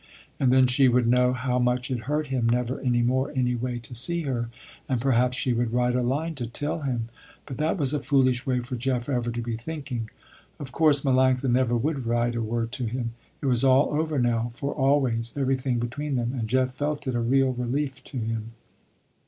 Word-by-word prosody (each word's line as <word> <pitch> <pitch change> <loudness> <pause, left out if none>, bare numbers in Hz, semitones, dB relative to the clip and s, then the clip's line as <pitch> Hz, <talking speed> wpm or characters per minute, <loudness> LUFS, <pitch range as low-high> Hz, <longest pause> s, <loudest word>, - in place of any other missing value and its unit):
And 130 -2 +3
then 130 0 +6
she 130 +2 +4
would 125 0 +3
know 125 +1 +4
how 125 0 -1
much 125 +1 0
it 120 -4 -3
hurt 150 +1 0
him 130 -4 0
never 125 +2 0
any 120 -2 +1
more, 130 +2 +1
any 125 -1 +1
way, 120 0 -2
to 120 +1 -8
see 165 +8 +1
her, 120 -5 -2 0.4
and 130 -3 +1
perhaps 125 0 +2
she 125 - 0
would 120 -1 0
write 125 0 +2
a 125 - +2
line 145 +7 -1
to 120 - -2
tell 145 +7 -3
him. 120 -5 -2 0.4
But 135 - -7
that 155 +5 0
was 140 -4 0
a 150 - +1
foolish 130 -4 +2
way 125 -2 0
for 125 +2 -5
Jeff 125 0 -1
ever 120 -3 0
to 120 0 -3
be 115 -1 -3
thinking. 125 -3 -5 0.5
Of 135 -3 -7
course 150 0 +3
Melanctha 130 -1 +2
never 120 -1 +2
would 135 0 -2
write 120 0 +1
a 115 - -2
word 115 +1 -2
to 125 - -2
him. 115 0 -3 0.3
It - - -4
was 125 -2 +2
all 135 +1 +5
over 155 0 0
now 120 -2 +1
for 140 +2 -3
always, 135 -4 +1
everything 130 -2 0
between 135 +5 -3
them, 120 0 -1
and 115 -3 -2
Jeff 130 +1 +1
felt 145 +1 -3
it 130 - -1
a 120 - 0
real 130 +2 +2
relief 130 +3 -2
to 135 - -8
him. 115 -1 -3
125 Hz, 215 wpm, -26 LUFS, 120-135 Hz, 0.5 s, then